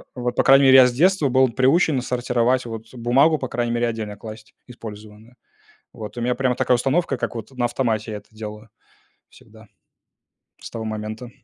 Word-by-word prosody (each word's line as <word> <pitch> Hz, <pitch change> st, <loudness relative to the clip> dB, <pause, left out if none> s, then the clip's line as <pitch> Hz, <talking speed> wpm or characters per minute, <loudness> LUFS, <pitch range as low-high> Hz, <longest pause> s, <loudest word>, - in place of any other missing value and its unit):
вот, 125 Hz, -1 st, -3 dB
по -, -, +2 dB
крайней 135 Hz, +1 st, +6 dB
мере, 130 Hz, 0 st, +8 dB
я 130 Hz, -1 st, +8 dB
с 120 Hz, -, -3 dB
детства 165 Hz, 0 st, +2 dB
был 130 Hz, 0 st, +3 dB
приучен 135 Hz, +3 st, +2 dB
сортировать 125 Hz, 0 st, 0 dB
вот 115 Hz, 0 st, -8 dB
бумагу, 130 Hz, +6 st, +2 dB
по 130 Hz, -, -4 dB
крайней 120 Hz, 0 st, -2 dB
мере, 120 Hz, 0 st, 0 dB
отдельно 110 Hz, -3 st, -5 dB
класть 110 Hz, 0 st, -11 dB
использованную. 110 Hz, 0 st, -12 dB, 0.6 s
Вот 110 Hz, +1 st, -9 dB
у -, -, -3 dB
меня 125 Hz, +1 st, 0 dB
прямо 130 Hz, -1 st, 0 dB
такая 125 Hz, -, +2 dB
установка, 135 Hz, +3 st, 0 dB
как -, -, -4 dB
вот 115 Hz, 0 st, -7 dB
на 125 Hz, -2 st, -1 dB
автомате 115 Hz, -3 st, -2 dB
я -, -, -4 dB
это 100 Hz, -, -20 dB
делаю 105 Hz, 0 st, -9 dB, 0.6 s
всегда. 110 Hz, 0 st, -18 dB, 0.9 s
С -, -, -9 dB
того 115 Hz, -1 st, -6 dB
момента. 110 Hz, +2 st, -6 dB
120 Hz, 185 wpm, -22 LUFS, 110-130 Hz, 0.9 s, мере